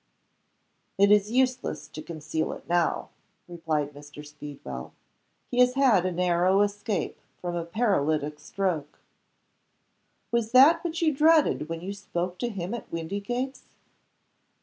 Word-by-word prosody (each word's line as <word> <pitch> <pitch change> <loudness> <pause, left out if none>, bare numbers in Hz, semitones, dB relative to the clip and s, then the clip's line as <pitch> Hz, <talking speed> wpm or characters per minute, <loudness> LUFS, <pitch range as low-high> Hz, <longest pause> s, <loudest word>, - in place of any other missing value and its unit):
"It 200 +1 +5
is 210 0 +4
useless 255 -8 0
to 155 - -8
conceal 160 -1 -3
it - - -12
now," 175 -1 +1 0.4
replied 160 -4 -2
Mr. 145 +1 -11
Speedwell. 145 - -8 0.6
"He 245 - 0
has 250 0 +5
had 235 -10 +4
a - - -1
narrow 180 +2 +2
escape 205 -1 -2 0.2
from 175 -1 -4
a 170 - -2
paralytic 155 -7 0
stroke." 170 -7 -3 1.3
"Was 235 -1 0
that 290 +6 +7
what 335 -1 -3
you 310 -2 +3
dreaded 290 - +3
when 165 0 -4
you 195 +3 -5
spoke 180 -2 -4
to 240 - -1
him 195 -2 -4
at 240 - -7
Windygates?" 200 +11 -4
185 Hz, 130 wpm, -27 LUFS, 160-240 Hz, 1.3 s, that